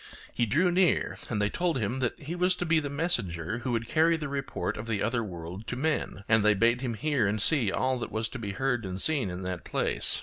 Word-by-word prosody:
He 120 - +1
drew 165 - +3
near, 180 0 +2
and 110 - -1
they 105 0 +1
told 175 -4 0
him 120 +2 -1
that 120 -3 -1
he 150 +4 -6
was 180 +1 +2
to 175 - -3
be 160 -1 +3
the 145 -2 -4
messenger 115 - -1
who 125 +1 -3
would 115 -1 -1
carry 165 +1 +3
the 150 -3 -4
report 140 -1 -3
of 105 +2 -6
the 105 -3 -1
other 115 +2 0
world 90 +2 -7
to 120 - -3
men, 140 -7 -1
and 110 -2 +4
they 105 0 +5
bade 115 +4 +3
him 120 -4 -2
hear 135 -3 +1
and 105 +2 0
see 115 -2 +4
all 130 +3 0
that - - -5
was 110 0 -1
to 125 - -7
be 100 -3 -4
heard 125 0 0
and 95 -1 -4
seen 140 -5 +1
in 90 +1 -5
that 90 -1 -4
place. - - 0
120 Hz, 250 wpm, -28 LUFS, 105-150 Hz, -, they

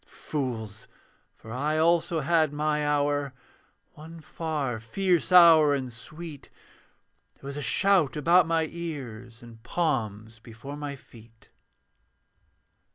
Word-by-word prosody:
Fools! 115 -7 -5 0.5
For 110 - -13
I 145 +6 -1
also 165 0 +2
had 160 0 +2
my 150 0 -1
hour; 145 -2 0 0.6
One 165 +2 -12
far 150 -7 -4
fierce 180 - 0
hour 165 -5 +7
and 130 -3 -5
sweet: 155 +5 -10 0.9
There - - -18
was 140 - -6
a 145 - -4
shout 175 - +2
about 170 +3 +4
my 165 -1 +1
ears, 125 -9 -8
And 115 -1 -14
palms 115 - -3
before 120 +5 -10
my 145 -1 -6
feet. 115 -3 -19
145 Hz, 115 wpm, -26 LUFS, 120-160 Hz, 0.9 s, hour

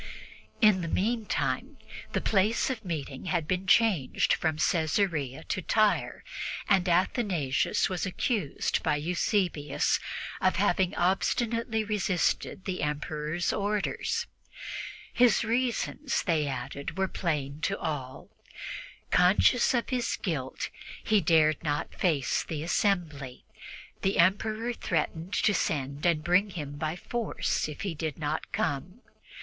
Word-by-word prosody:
In 210 -5 +6
the 165 - -3
meantime 220 +5 -1 0.4
the - - +1
place 215 +5 +2
of 230 -3 -5
meeting 150 -6 -5
had 170 -4 0
been 185 +1 -1
changed 190 - +3
from 160 -2 0
Caesarea 160 -4 0
to 185 - -2
Tyre, 215 +3 +1 0.4
and 190 -3 +3
Athanasius 175 - +1
was 180 -3 -3
accused 190 - -1
by - - +1
Eusebius 170 -1 0 0.4
of 185 - +3
having 185 -1 +2
obstinately 225 +5 +1
resisted 195 -2 0
the 185 -2 -2
Emperor's 150 +3 -2
orders. 205 0 -1 0.9
His 245 -2 +4
reasons, 250 +4 0
they 160 -5 +1
added, 140 +5 -5
were 190 0 +2
plain 150 -5 -2
to 195 - 0
all; 135 -5 -5 0.8
conscious 190 +7 +5
of 240 - 0
his 250 -2 0
guilt, 145 -9 -3 0.3
he 215 -2 +3
dared 155 -2 +4
not 145 -2 -2
face 150 -8 +1
the 155 -2 -4
assembly. 160 -8 -1 0.6
The 195 - +1
Emperor 215 +6 +2
threatened 165 -2 -2
to 205 - +3
send 140 -3 -1
and 160 -3 +2
bring 180 +5 +3
him 145 -6 -6
by 155 +2 -2
force 230 0 -2
if 150 - -7
he 195 -4 -2
did 155 -2 -4
not 155 0 -3
come. 165 - -2
175 Hz, 120 wpm, -29 LUFS, 150-205 Hz, 0.9 s, In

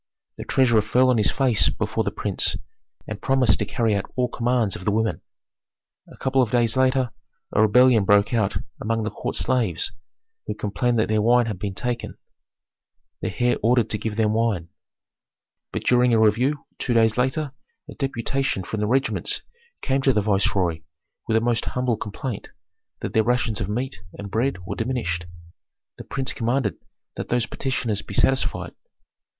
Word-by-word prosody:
The - - -6
treasurer 120 -5 +3
fell 125 +4 +3
on 120 - +2
his 105 - +3
face 130 -5 +3
before - - -1
the - - 0
prince, - - -1 0.5
and 110 -1 -6
promised 130 -5 +3
to - - 0
carry 115 -4 0
out 100 -1 -2
all 125 -1 +1
commands 120 -4 0
of - - -8
the 105 - +1
women. 110 +1 0 0.9
A - - -15
couple 130 0 +2
of 120 - +1
days 115 -1 +2
later, 130 -2 +2 0.4
a - - +3
rebellion 115 +1 +5
broke 100 +3 +3
out 110 -4 +1 0.2
among 115 0 -1
the 110 - -2
court - - -4
slaves, 115 -7 0 0.6
who - - -3
complained 120 +4 0
that 110 - +2
their 110 0 +2
wine 120 +2 +4
had 105 -5 -4
been 100 -1 -4
taken. 120 -2 -3 1.0
The - - -2
heir 120 0 +3
ordered 115 0 +2
to 105 - -1
give 105 0 -3
them 110 -1 +2
wine. 110 -7 0 1.0
But - - -4
during 125 -1 +4
a - - +4
review 125 +7 +2
two 120 - 0
days 110 -1 +4
later 135 +4 0 0.4
a - - -9
deputation 135 -4 -1
from 110 +4 -4
the 105 - 0
regiments 135 +4 0 0.4
came 135 0 +1
to 135 -1 +3
the 105 - +2
viceroy 95 -5 +1 0.5
with 110 -1 +3
a - - +2
most 120 -1 0
humble 125 -2 0
complaint, 110 +2 -5 0.5
that - - -4
their 110 - +4
rations 115 -2 0
of 100 - -2
meat 115 -1 -3 0.2
and 100 -1 -7
bread 110 -4 -1
were - - -4
diminished. 110 -8 -2 0.7
The - - -6
prince 135 -1 -3
commanded 120 -3 -1 0.4
that - - -5
those 120 -1 +1
petitioners 120 -6 -2
be 100 - -8
satisfied. 135 +5 +1
115 Hz, 175 wpm, -23 LUFS, 105-125 Hz, 1.0 s, rebellion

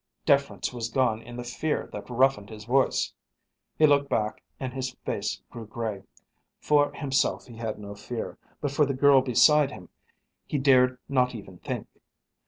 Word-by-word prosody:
Deference 140 -3 +1
was 115 -2 -3
gone 115 -3 +1
in 120 +1 -10
the 120 - -5
fear 135 +6 -2
that - - -7
roughened 125 -4 +2
his 110 -1 -10
voice. 130 +3 +2 0.6
He 155 - +6
looked 140 -1 +3
back 105 -1 -1 0.2
and 130 -2 -4
his 130 -1 -4
face - - -3
grew 115 -2 -8
grey. 110 -3 -4 0.6
For 145 -1 +3
himself 135 -2 0
he 120 -2 -12
had 115 -2 -4
no 100 -1 -8
fear, 110 +3 -6 0.2
but 145 - -1
for 145 +1 +3
the 140 - -1
girl 140 0 +6
beside 140 +3 +5
him 90 - -11 0.6
he 150 - -1
dared 130 -2 +4
not 125 -2 +1
even 95 -5 -10
think. - - -5
125 Hz, 170 wpm, -27 LUFS, 115-140 Hz, 0.6 s, He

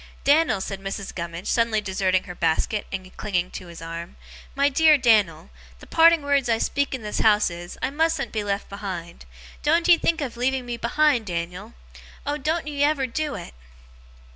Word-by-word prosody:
'Dan'l,' 295 -6 +3
said 195 0 -5
Mrs. 195 0 -5
Gummidge, 170 +1 -6
suddenly 230 -2 +2
deserting 190 -2 0
her 180 - -8
basket, 170 +5 0
and 185 -1 -6
clinging 180 -3 -1
to 180 - -8
his 170 -1 -10
arm 165 +1 -7 0.4
'my 280 +1 +3
dear 305 +2 +5
Dan'l, 210 - +2 0.3
the - - -13
parting 330 -1 +5
words 280 -3 +1
I 225 - +3
speak 280 +4 -1
in 250 - -8
this 210 - -3
house 210 -3 +4
is, 175 +1 -8
I 260 - 0
mustn't 320 -1 0
be 215 -2 -2
left 200 0 -2
behind. 185 - -7 0.4
Doen't 335 +3 +2
ye 345 -2 +7
think 335 0 +1
of 255 -5 -4
leaving 255 +1 0
me 240 -1 -4
behind, 245 -1 +2
Dan'l! 180 +5 -5 0.5
Oh, 295 +1 -2
doen't 315 +4 -1
ye 290 -1 -1
ever 290 -2 +2
do 295 +4 -3
it! - - -8
225 Hz, 185 wpm, -24 LUFS, 185-285 Hz, 0.5 s, ye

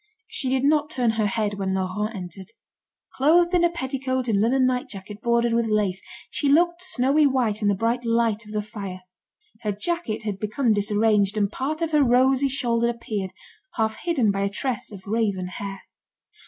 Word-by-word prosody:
She 260 - -3
did 260 0 +1
not 300 +1 +3
turn 245 -6 +1
her 220 -1 0
head 205 -1 -2
when 190 -1 -1
Laurent 190 +4 -2
entered. 190 +3 -8 0.6
Clothed 340 +6 +4
in 350 -1 +4
a 345 - +5
petticoat 260 -5 -2
and 205 -3 +2
linen 255 +4 +3
night 250 -1 0
jacket 205 +1 -9
bordered 235 0 +2
with 230 0 +1
lace, 205 -3 0 0.3
she 285 - 0
looked 345 +4 +3
snowy 285 -2 +3
white 240 -6 0
in 205 - +1
the 200 - +3
bright 230 +4 0
light 230 -1 +1
of 210 - -12
the 210 -1 -2
fire. 200 -4 -7 0.6
Her 210 - -1
jacket 225 - -3
had 205 -3 -3
become 220 +3 +1
disarranged, 210 0 +2
and 200 -1 +1
part 305 +7 -2
of 325 - -1
her 300 -1 +4
rosy 260 +2 +4
shoulder 235 -3 +1
appeared, 220 -5 -4 0.5
half 220 -1 0
hidden 275 -12 +1
by 195 0 -2
a 200 - +1
tress 240 +3 -3
of 195 -2 -11
raven 205 -3 0
hair. 195 +2 -6
230 Hz, 185 wpm, -24 LUFS, 205-265 Hz, 0.6 s, a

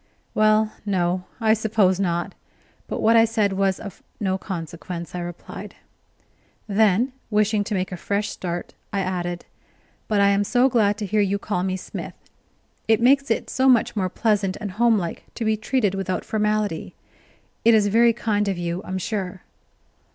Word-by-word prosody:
"Well, 215 0 +3
no, 185 -2 0
I 220 -2 +4
suppose 210 -4 +2
not, 175 0 -1 0.5
but - - -3
what 225 +1 +5
I 225 - +7
said 220 -3 +1
was 195 -1 +1
of 200 -3 -9 0.2
no 190 -3 0
consequence," 170 -2 -6
I 180 - -3
replied; 175 0 -8 0.9
then, 215 +4 +3 0.2
wishing 210 -1 +2
to 210 - -2
make 185 0 -2
a 180 - -4
fresh 200 +4 -1
start, 175 -1 -5 0.2
I 200 - 0
added: 175 -2 -3 0.6
"But 210 -2 +1
I 200 0 +5
am 200 0 +3
so 245 +5 +3
glad 210 -4 +2
to 210 - -3
hear 210 +2 +1
you 200 0 +1
call 200 -2 -2
me 185 0 -1
Smith. - - -7 0.7
It 220 -1 +4
makes 275 +3 +4
it 225 - 0
so 265 0 +2
much 240 -3 +3
more 190 -3 0
pleasant 205 -2 0
and 205 -2 -4
homelike 215 -5 +1
to 230 - -3
be 220 0 +2
treated 215 -1 0
without 190 -1 -2
formality. 210 -5 -1 0.7
It 230 0 +6
is 210 -2 +4
very 230 +3 +5
kind 210 -3 0
of 195 -2 -1
you, 175 +1 -3
I'm 190 - -4
sure." 185 -1 -4
205 Hz, 170 wpm, -23 LUFS, 185-220 Hz, 0.9 s, I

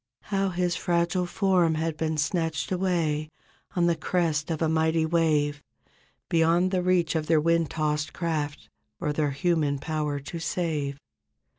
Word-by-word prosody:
How 195 0 +2
his 175 -1 0
fragile 175 +1 0
form 180 -4 +2
had 160 0 -1
been 160 0 -1
snatched 160 +3 -1
away 170 -5 0 0.5
On 175 -1 +3
the 170 -1 +3
crest 160 -4 0
of 160 -2 -1
a 160 - +2
mighty 160 0 +2
wave. 155 -3 +1 0.7
Beyond 170 +2 +3
the 185 -2 +1
reach 180 -2 +2
of 155 -2 -1
their 160 -1 +4
wind 165 0 +2
tossed 150 -1 -1
craft 155 -4 -3 0.3
Or 150 -4 -1
their 150 -1 +1
human 145 0 +1
power 150 0 -2
to 140 +5 -7
save. 155 -5 -2
160 Hz, 150 wpm, -26 LUFS, 150-175 Hz, 0.7 s, their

